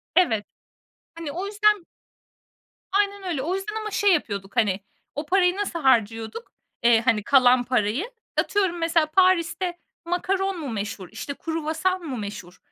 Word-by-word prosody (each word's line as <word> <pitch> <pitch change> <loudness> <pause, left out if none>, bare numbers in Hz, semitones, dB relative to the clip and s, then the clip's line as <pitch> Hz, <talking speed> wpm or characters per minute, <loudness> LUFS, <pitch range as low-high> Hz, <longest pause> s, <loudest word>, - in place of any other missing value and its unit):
Evet, 225 - +3 0.7
hani, 330 -3 -6
o 365 +5 -4
yüzden 415 -2 +2 1.1
Aynen 400 0 +1
öyle. 320 -7 -1
O 340 +7 -1
yüzden 405 +3 -4
ama 430 -1 -4
şey 405 -2 +3
yapıyorduk, 200 - -2
hani, 205 -6 +2 0.4
o 295 - -3
parayı 360 +2 +3
nasıl 395 -4 -3
harcıyorduk, 230 - +1 0.3
eee, 235 -1 +5
hani, 225 -4 +2
kalan 255 -1 +5
parayı? 245 - 0 0.3
Atıyorum 380 -4 +1
mesela 330 -1 +2
Paris'te 355 +1 +2 0.3
makaron 375 +2 -1
mu 295 -4 -5
meşhur, 205 -4 -5
işte, 220 +6 -5
kruvasan 325 +4 -2
mı 270 -5 -4
meşhur, 200 -4 -7
325 Hz, 140 wpm, -24 LUFS, 235-375 Hz, 1.1 s, eee